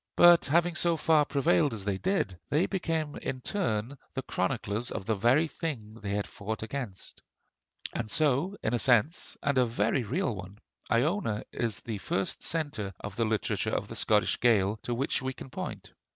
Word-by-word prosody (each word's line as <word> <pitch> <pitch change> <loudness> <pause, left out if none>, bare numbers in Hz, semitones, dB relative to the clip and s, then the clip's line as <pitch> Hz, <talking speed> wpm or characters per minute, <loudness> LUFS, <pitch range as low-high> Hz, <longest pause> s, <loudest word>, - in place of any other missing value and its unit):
But 175 -1 +7
having 170 +4 +3
so 170 -1 +2
far 155 -1 +4
prevailed 145 -1 +2
as 100 -3 -6
they 100 -2 -1
did, 185 - 0
they 155 +6 +3
became 160 -6 -2
in 130 - -4
turn 130 - -2 0.2
the 135 - -2
chroniclers 105 +4 -1
of 95 - -4
the 110 - +1
very 120 +10 +3
things 115 -10 -5
they 100 -1 -3
had 105 - -1
fought 110 +2 -5
against. 110 -5 -6 0.9
So 155 - +1
in 110 - 0
a 120 - +2
sense, 130 - +2
and 140 -2 +2
a 125 - +5
very 120 +3 +1
real 125 - -1
one, 95 +2 -9 0.3
Iona 120 - +1
is 110 -3 -2
the 110 -4 -4
first 95 +1 -2
centre 130 - -2
of 100 -1 -7
the 115 - +1
literature 110 -1 0
of - - -2
the - - -7
Scots 105 -1 +2
Gaels 110 -3 +3
to 120 - -2
which 135 +3 0
we 130 0 -2
can 130 - -10
point. - - -6
125 Hz, 180 wpm, -29 LUFS, 105-155 Hz, 0.9 s, But